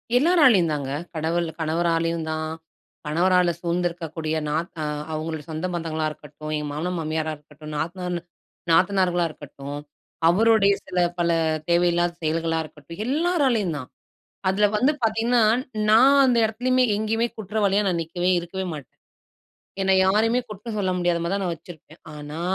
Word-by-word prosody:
எல்லாராலையும் 255 - +5
தாங்க. 140 -2 -3 0.2
கடவுள் 165 +2 0
கணவராலயும் 165 0 0
தான், 155 0 -3 0.6
கணவரால 175 +3 +3
சூழ்ந்திருக்கக்கூடிய 170 -2 -2
நாத் 160 +4 -2
ஆ - - -1 0.3
அவுங்களோட 155 0 -3
சொந்த 160 +3 -3
பந்தங்களா 160 -2 -2
இருக்கட்டும், 150 +1 -9
என் 150 -1 -4
மாமனார், 170 +5 -3
மாமியாரா 155 0 -2
இருக்கட்டும், 150 +1 -12
நாத்தனார்ன்னு 175 +2 -3 0.5
நாத்தனார்களாக 180 -1 +3
இருக்கட்டும், 145 -1 -8 0.5
அவருடய 205 +1 +4
சில 180 -1 -2 0.2
பல 170 0 +2 0.4
தேவையில்லாத 175 0 +2
செயல்களா 165 +1 0
இருக்கட்டும், 155 +4 -10
எல்லாராலயும் 270 - +1
தான். 130 -3 -8 0.6
அதுல 200 +2 +3
வந்து 260 +7 +3
பாத்தீங்கன்னா, 225 +2 +2 0.5
நான் 260 +6 +6
அந்த 250 -2 +3
இடத்துலயுமே, 250 +4 +2
எங்கயுமே 225 +2 0
குற்றவாளியா 205 -1 +1
நான் 175 -2 0
நிக்கவே, 175 +3 -1
இருக்கவே 185 +2 -5
மாட்டேன். 145 -5 -10 0.9
என்ன 190 0 +3
யாரையுமே 225 +5 +3
குற்றம் 215 +2 -6
சொல்ல 190 -2 0
முடியாத 175 -1 +1
மாரி 170 +3 -1
தான் 200 -1 -1
நான் 175 -2 -1
வச்சுருப்பேன். 160 -1 -14 0.2
ஆனா, 150 +2 -7
175 Hz, 135 wpm, -24 LUFS, 160-210 Hz, 0.9 s, நான்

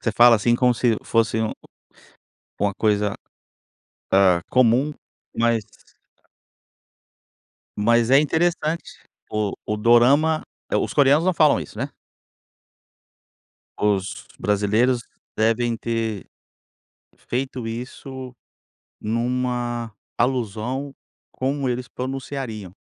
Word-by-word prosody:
Você 115 - 0
fala 120 +2 +7
assim 115 +2 +2
como 125 0 +3
se 115 -1 +1
fosse 115 -1 +1
um 110 - -1 1.1
uma 100 0 +1
coisa, 105 0 +1 1.0
ah, 95 -3 +5
comum, 130 +3 +3 0.5
mas 115 -1 +2 2.2
mas 115 +2 +3
é 135 +2 +7
interessante, 160 +1 -1 0.3
o 105 -2 -1
o 105 - -1
Dorama 135 +8 +4 0.3
os - - 0
coreanos 145 +3 +4
não 185 - +3
falam 155 -3 +4
isso, - - -9
né? - - -3 1.9
Os 100 -2 -1
brasileiros 105 +5 +2 0.3
devem 115 +2 +1
ter 115 -3 -3 1.0
feito 130 -1 -3
isso 125 +2 -7 0.6
numa 120 0 -2 0.3
alusão 125 +2 -1 0.4
como 135 0 -2
eles 125 0 -3
pronunciariam. 130 -7 -5
120 Hz, 90 wpm, -22 LUFS, 110-130 Hz, 2.2 s, fala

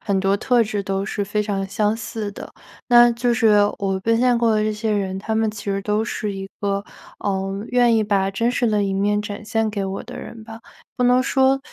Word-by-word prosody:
很 200 -3 0
多 195 +1 +2
特 245 +3 +2
质 210 -2 -2
都 195 0 -2
是 205 0 -3
非 210 +2 -1
常 200 -2 -2
相 210 +2 0
似 220 -2 -5
的。 200 - -10 0.4
那 240 -1 +7
就 240 +1 0
是 220 -2 +4 0.2
我 195 -1 -1
奔 230 +3 +1
现 250 -1 +3
过 235 -1 +2
的 215 - +2
这 215 - 0
些 215 +1 -2
人， 190 -2 -1
他 220 +3 -3
们 220 0 +1
其 210 -1 -9
实 195 -1 -1
都 210 +2 0
是 210 -3 -3
一 195 0 -6
个， 200 0 -1 0.4
呃， 195 0 -2
愿 245 -2 +3
意 220 - +2
把 195 -2 +1
真 230 +5 0
实 245 0 0
的 210 -2 +1
一 195 - -1
面 205 +2 +1
展 205 -1 -6
现 225 0 -1
给 205 -1 -3
我 195 0 -4
的 245 - -9
人 225 -2 -9
吧， 225 0 -10 0.3
不 - - -2
能 250 +1 +4
说， 265 0 +3
210 Hz, 250 characters per minute, -21 LUFS, 200-230 Hz, 0.4 s, 那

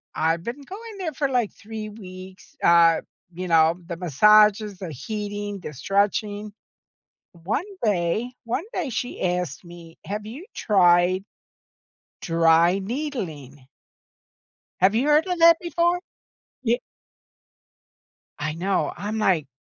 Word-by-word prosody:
I've 165 +1 0
been 245 +7 -5
going 420 +8 -9
there 335 -5 -3
for, 280 0 -1
like, 245 -5 0
3 215 0 -7
weeks, 185 -2 -12
uh, 170 -1 +5 0.3
you 180 +2 -5
know, 165 0 +4
the 170 - -4
massages, 210 +5 +4
the 180 -4 -6
heating, 205 - -5
the 155 - -8
stretching. 205 - -1 0.8
One 190 - -3 0.2
day 210 +4 0
one 240 +8 -2
day, 345 -6 -2
she 245 +1 -4
asked 180 -6 -2
me, 170 -1 -13
"Have 210 +1 -4
you 255 +11 -8
tried 185 -2 +3 1.0
dry 165 +2 +3
needling?" 190 - -5 1.1
Have 195 +3 +4
you 255 +6 +1
heard 300 +3 +4
of 360 -1 -2
that 335 0 +7
before? 345 +1 +1 0.6
Y 240 -1 +2 1.6
I 155 +1 -2
know, 185 +4 0
I'm 210 +4 -4
like, 185 -9 +2
200 Hz, 120 wpm, -24 LUFS, 170-235 Hz, 1.6 s, that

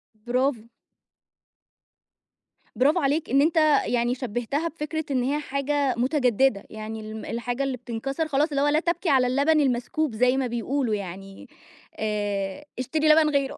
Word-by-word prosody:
برافو. 245 +2 -1 2.1
برافو 290 +7 +3
عليك، 295 +1 0
إن 275 +2 +4
أنت 320 +3 +2 0.3
يعني 240 0 0
شبهتها 255 +5 -2
بفكرة 315 -1 -4
إن 255 -2 +1
هي 280 +4 0
حاجة 280 -1 -1
متجددة، 255 -4 +2
يعني 215 +1 -7
ال 215 0 -7
الحاجة 245 +3 -3
اللي 270 -2 -2
بتنكسر 255 +6 -3
خلاص، 295 +1 +1
اللي 280 -2 -1
هو 290 - +3
لا 300 +1 +3
تبكي 340 +1 -1
على 260 -3 +4
اللبن 285 +5 +3
المسكوب، 270 +1 0
زي 250 +3 +3
ما 265 -2 0
بيقولوا 240 0 -1
يعني، 195 0 -8 0.5
آآ 205 +2 -2
اشتري 305 +5 0
لبن 310 0 +6
غيره. 280 -2 -1
265 Hz, 145 wpm, -25 LUFS, 235-295 Hz, 2.1 s, لبن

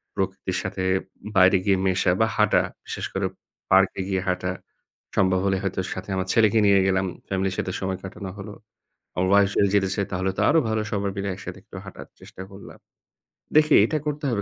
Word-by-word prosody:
প্রকৃতির - - -2
সাথে 95 - -4 0.5
বাইরে 95 +1 +6
গিয়ে 100 -2 +3
মেশা 95 -1 +2
বা 110 - +4
হাঁটা, 105 - +4 0.2
বিশেষ - - -5
করে - - -1 0.5
পার্কে 95 0 +4
গিয়ে 95 -1 -1
হাঁটা। 90 0 -1 0.7
সম্ভব 95 -1 +3
হলে 95 -1 +2
হয়তো 95 -1 -2
সাথে 95 +2 -8
আমার 95 0 -2
ছেলেকে 110 -1 +4
নিয়ে 100 -1 +5
গেলাম, 95 0 +1 0.2
family 95 0 0
'র - - -5
সাথে 95 - -2
সময় 95 -1 -2
কাটানো 95 0 -7
হলো। 105 +1 -8 0.6
আমার 95 +1 0
wife 100 -1 +4
যদি 100 - +4
যেতে 95 -1 +2
চাই 100 -2 -1
তাহলে 95 +1 0
তো - - +2
আরও 160 +2 +5
ভালো। 110 0 0
সবাই 100 -1 -1
মিলে 100 0 -3
একসাথে 95 - -8
একটু - - -12
হাঁটার - - -10
চেষ্টা 95 - -11
করলাম। 100 0 -12 0.8
দেখি 155 0 +5
এটা 155 - -1
করতে 150 0 -3
হবে। 110 -5 -1
95 Hz, 190 wpm, -24 LUFS, 95-100 Hz, 0.8 s, বাইরে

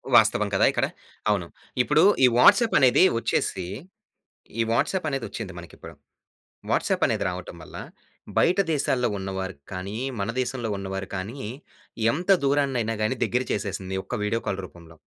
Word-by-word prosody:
వాస్తవం - - +5
కదా! - - +4
ఇక్కడ. - - +1 0.4
అవును. 95 -5 +1 0.3
ఇప్పుడు 150 +6 +3 0.2
ఈ - - +8
వాట్సాప్ 225 - +6
అనేది 130 +6 +5 0.2
వచ్చేసి, 95 -5 -1 1.0
ఈ - - +5
వాట్సాప్ 180 +7 0
అనేదొచ్చింది 115 -7 -4
మనకి 85 -2 -11
ఇప్పుడు. - - -11 0.8
వాట్సాప్ - - +1
అనేది - - 0
రావటం 90 -1 -7
వల్ల, - - -10 0.6
బయట 180 +3 +4
దేశాల్లో 125 -4 +1
ఉన్న 95 0 -5
వారికి 95 -7 -6
కానీ, 95 +4 -5 0.2
మన 100 +3 -2
దేశంలో 120 -2 -3
ఉన్న 95 0 -6
వారు 95 0 -4
కానీ, 105 +9 -5 0.7
ఎంత 175 +8 -4
దూరాన్నయినా 135 -5 +1
గాని 125 +4 0
దగ్గర 125 +1 0
చేసేసింది 95 -2 -3
ఒక్క 125 - -4
వీడియో 115 +2 0
కాల్ 95 0 -1
రూపంలో. 85 -1 -16
115 Hz, 145 wpm, -25 LUFS, 95-130 Hz, 1.0 s, ఈ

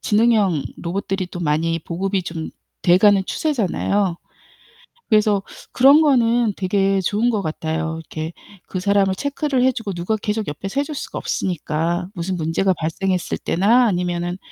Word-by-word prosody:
지능형 210 -7 +2 0.2
로봇들이 190 +1 -3
또 175 - -8
많이 165 +1 0
보급이 185 +4 -2
좀 165 -2 -5 0.3
돼 175 0 +5
가는 200 0 +5
추세잖아요. 205 - 0 0.9
그래서 210 -3 +3 0.3
그런 275 +4 +6
거는 240 -5 +3
되게 195 0 +1
좋은 210 +6 +1
것 215 -3 0
같아요. 160 -1 -3
이렇게 160 0 -6 0.4
그 185 - -4
사람을 195 0 +2
체크를 285 +1 -1
해 260 - +4
주고 225 -4 -4
누가 175 +5 -1
계속 210 0 -2
옆에서 195 - -4
해 - - +2
줄 300 - -7
수가 285 - -6
없으니까. 170 0 -2
무슨 185 0 -3
문제가 170 +3 +1
발생했을 180 +3 -2
때나 225 +8 +3
아니면은 175 -2 -1
195 Hz, 330 characters per minute, -21 LUFS, 170-215 Hz, 0.9 s, 그런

